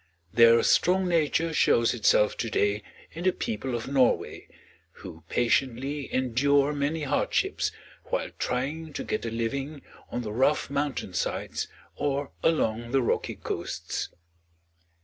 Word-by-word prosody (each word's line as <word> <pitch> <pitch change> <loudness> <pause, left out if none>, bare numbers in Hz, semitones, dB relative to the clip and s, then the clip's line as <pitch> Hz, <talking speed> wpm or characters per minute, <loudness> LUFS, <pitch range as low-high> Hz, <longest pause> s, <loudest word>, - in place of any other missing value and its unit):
Their 115 0 +6
strong 185 +1 +3
nature 165 -1 +1
shows 115 -6 +3
itself 105 -2 +3
to 115 - -2
day 105 0 +1 0.3
in 165 - -7
the 185 - +4
people 120 -3 -3
of 115 - -4
Norway, 135 -3 +1 0.5
who 85 -3 -11
patiently 135 +4 0
endure 140 +3 +2
many 145 +2 -1
hardships 140 - 0 0.3
while - - -2
trying 150 +5 -2
to - - -4
get 215 - -3
a - - -1
living 135 +6 -3 0.3
on 120 - -3
the 105 -2 -5
rough 135 +5 +2
mountain 140 -9 -2
sides 90 - -2 0.3
or 140 -1 -1
along 120 -7 +1
the 135 -2 +3
rocky - - -1
coasts. - - -4
135 Hz, 130 wpm, -27 LUFS, 115-145 Hz, 0.5 s, Their